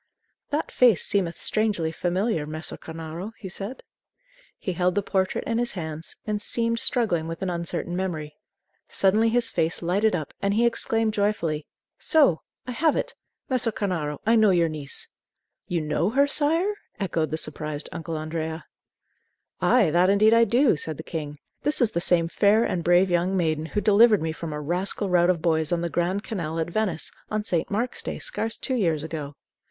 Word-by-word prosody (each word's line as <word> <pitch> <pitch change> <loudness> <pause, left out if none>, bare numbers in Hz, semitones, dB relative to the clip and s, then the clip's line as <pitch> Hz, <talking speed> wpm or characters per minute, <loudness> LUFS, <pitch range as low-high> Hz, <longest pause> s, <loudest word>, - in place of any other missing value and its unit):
"That 295 +2 -2
face 240 -8 +4
seemeth 180 -4 0
strangely 205 -7 0
familiar, 175 -1 -1
Messer 155 +1 -6
Cornaro," 165 +6 -7
he 205 - -8
said. 200 +7 -7 0.7
He 185 - -3
held 180 +1 +1
the 205 - +1
portrait 190 -1 0
in 230 0 -1
his 240 0 0
hands, 160 -3 -5
and 210 -1 -2
seemed 230 +1 +1
struggling 230 - +1
with 165 +3 -5
an 185 - -1
uncertain 170 0 -3
memory. 160 -5 -3 0.5
Suddenly 215 +4 +2
his 230 0 +2
face 165 +1 -1
lighted 195 +4 +2
up, 155 -5 -5
and 200 0 +1
he 235 +2 +3
exclaimed 225 -1 +1
joyfully: 185 -8 -1 0.3
"So; 280 - +3 0.2
I 255 - -5
have 300 +5 +2
it! - - -2 0.3
Messer 250 -3 0
Cornaro, 170 -9 -2
I 225 +2 +4
know 220 -2 +5
your 175 -3 +3
niece." 150 -3 -5 0.6
"You 170 -2 -1
know 155 +4 0
her, 275 +5 +3
sire?" 320 +7 +2 0.3
echoed 170 -5 -1
the 155 - -2
surprised 155 -1 -2
Uncle 165 -1 -5
Andrea. 160 +1 -4 1.0
"Ay, 225 -11 +4
that 175 +3 +4
indeed 215 +3 +5
I 230 0 +6
do," 240 - +3
said 155 -1 -4
the 160 - -7
king. 150 -3 -5 0.2
"This 295 - +2
is 235 -3 +3
the 170 - -1
same 170 -2 +3
fair 205 +5 +3
and 175 -6 -1
brave 175 +2 +4
young 175 +2 +1
maiden 160 -2 0
who 210 - -2
delivered 210 -2 +5
me 160 - -1
from 160 0 -6
a 150 - -4
rascal 180 +5 0
rout 175 0 +4
of 170 -3 +1
boys 160 -2 +2
on 170 -1 +1
the 170 - -2
Grand 180 +4 -1
Canal 165 -7 -4
at 165 +1 -2
Venice, 190 -5 -1 0.2
on 215 0 -1
St. 175 -6 -1
Mark's 230 +5 -2
Day, - - -5
scarce 225 - -2
two 260 - -1
years 165 - +1
ago." 150 -3 -6
180 Hz, 185 wpm, -25 LUFS, 160-220 Hz, 1.0 s, I